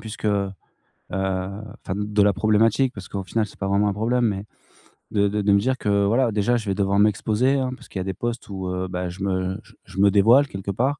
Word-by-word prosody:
puisque, 110 0 -9
heu 100 -2 +1 0.6
enfin 95 +3 -4
de 105 0 +1
la 100 0 +4
problématique, 110 +5 +2
parce 100 -1 -9
qu'au 100 -1 -4
final, 110 +3 0
c'est - - -16
pas 95 - -2
vraiment 100 +1 +2
un - - 0
problème, 120 +4 0
mais, 100 -1 -2 0.7
de 100 -1 +2
de 105 +1 -1
de 100 0 +2
me 100 - +5
dire 130 +5 0
que 100 -2 +1
voilà, 115 +3 +2
déjà, 110 +4 +1
je 110 -3 -6
vais 95 - +1
devoir 100 0 +1
m'exposer, 110 +5 +2
hein, 130 -1 -1
parce - - -16
qu'il 95 - -6
y - - -1
a - - -2
des 95 -1 -4
posts 120 -2 -4
où, 95 -1 -5
heu, 90 0 -2
bah 90 0 -3
je 90 +2 -9
me 95 -1 -1
je - - -21
je 95 - -9
me 100 0 +6
dévoile 115 +8 +5
quelque 95 -2 -5
part. 135 +8 0
100 Hz, 245 wpm, -23 LUFS, 95-110 Hz, 0.7 s, me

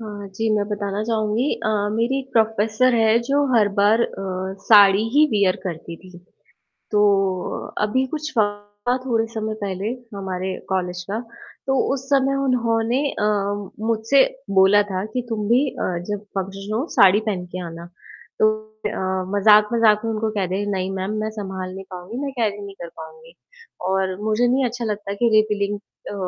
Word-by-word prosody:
हाँ 205 -2 -7
जी, 225 +2 -1
मैं 205 - +1
बताना 205 -1 -2
चाहूँगी 220 +1 0 0.2
अ, - - +1 0.3
मेरी 235 +4 +1
एक 265 0 -8
प्रोफ़ेसर 220 +2 +2
है 225 0 +4
जो 285 +1 +3
हर 215 -3 +4
बार 210 +3 +4
अ, - - +2 0.6
साड़ी 205 -2 +7
ही 300 +1 +7
वियर 200 -4 +2
करती 170 -2 -6
थी। 185 +1 -14 0.7
तो 210 -1 +3 0.7
अ, - - -13
अभी 260 +5 +1
कुछ 305 0 -4 0.7
थोड़े 230 -3 +1
समय 220 -1 -3
पहले 195 0 -3 0.3
हमारे 190 -1 -4 0.2
कॉलेज 180 -1 -2
का, 220 - -1 0.5
तो 270 - +2 0.2
उस 270 -1 -5
समय 275 -1 +3
उन्होंने 235 -1 +1
अ, - - -4 0.6
मुझसे 230 +4 +4 0.4
बोला 195 +2 +6
था 185 0 -2
कि 250 - 0
तुम 210 -2 -2
भी 255 +5 +4
अ, 180 -7 -3
जब 205 0 -3
फंक्शन 195 +2 -4
हो, 260 - -1
साड़ी 195 +1 +6
पहन 185 -4 -2
के 185 - -3
आना। 165 0 -8 0.5
तो 215 - +6 0.4
अ, 190 -2 -2
मज़ाक-मज़ाक 210 +1 +5
में 225 - -1
उनको 220 0 -1
कह 190 - +1
दिया, 200 +3 -2
नहीं 190 -1 -2
मैम, 190 +2 -3
मैं 215 - -2
सँभाल 190 -2 -5
नहीं 195 - -7
पाऊँगी, 180 +5 -7
मैं 275 - -3
कैरी 205 -2 0
नहीं 200 -1 -10
कर - - -6
पाऊँगी। 480 +2 -12 0.6
और 190 -1 0
मुझे 220 +3 +2
नहीं 260 +2 +2
अच्छा 240 0 -3
लगता 205 -2 -3
कि 235 - +5
रिवीलिंग 205 -1 +1 0.3
अ, - - -5
210 Hz, 170 wpm, -22 LUFS, 195-230 Hz, 0.7 s, साड़ी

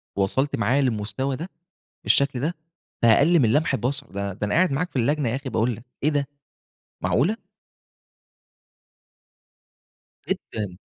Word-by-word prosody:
وصلت 115 +9 +1
معايا 120 +6 +2
للمستوى 120 +2 -1
ده، 165 +7 -6 0.5
بالشكل 140 -2 +3
ده 155 +7 -1 0.5
في 115 - +5
أقل 150 +9 +5
من 115 -5 +3
لمح 150 0 +2
البصر؟ 135 +2 -1
ده 100 0 -3
ده 100 - -17
أنا - - -1
قاعد 180 -1 +4
معاك 165 +6 -1
في - - -26
اللجنة 145 +1 +1
يا 115 - -1
أخي 135 0 -5
باقول 115 0 0
لك، 115 - -14 0.2
إيه 150 - +4
ده، 145 -2 0 0.7
معقولة؟ 180 - +1 2.9
جدًا. 105 - -4
135 Hz, 145 wpm, -24 LUFS, 110-145 Hz, 2.9 s, في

